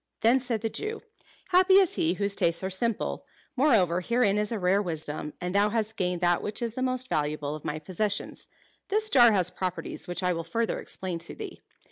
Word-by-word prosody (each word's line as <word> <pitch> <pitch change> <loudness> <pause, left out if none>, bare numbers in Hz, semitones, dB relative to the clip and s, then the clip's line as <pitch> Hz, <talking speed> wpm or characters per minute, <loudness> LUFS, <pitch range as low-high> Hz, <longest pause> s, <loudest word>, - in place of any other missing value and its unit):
Then 235 +4 +5
said 240 -4 -2
the 225 - 0
Jew, 430 - -5 0.5
"Happy 375 +1 +5
is 385 -3 +5
he 165 +2 +1
whose 200 +1 0
tastes 170 +2 +1
are 190 - -2
simple! 225 +3 -1 0.3
Moreover, 210 - +3
herein 220 -1 +2
is 210 +1 0
a 230 - -1
rare 190 +1 +2
wisdom, 155 -4 -4
and 180 0 -3
thou 205 +1 +3
hast 220 0 -2
gained 180 -3 -1
that 175 -1 +2
which 210 - -4
is 235 -2 -2
the 255 - -4
most 255 0 -1
valuable 150 - -1
of 155 - -8
my 150 - -3
possessions. 190 +6 -3 0.4
This 430 +2 +2
jar 240 -3 +7
has 185 -3 +2
properties 185 -1 -4
which 175 +1 -4
I 180 0 +2
will 165 -1 -3
further 225 +7 -1
explain 180 -3 -4
to 165 - -3
thee. 415 -4 -8
200 Hz, 205 wpm, -27 LUFS, 175-235 Hz, 0.5 s, jar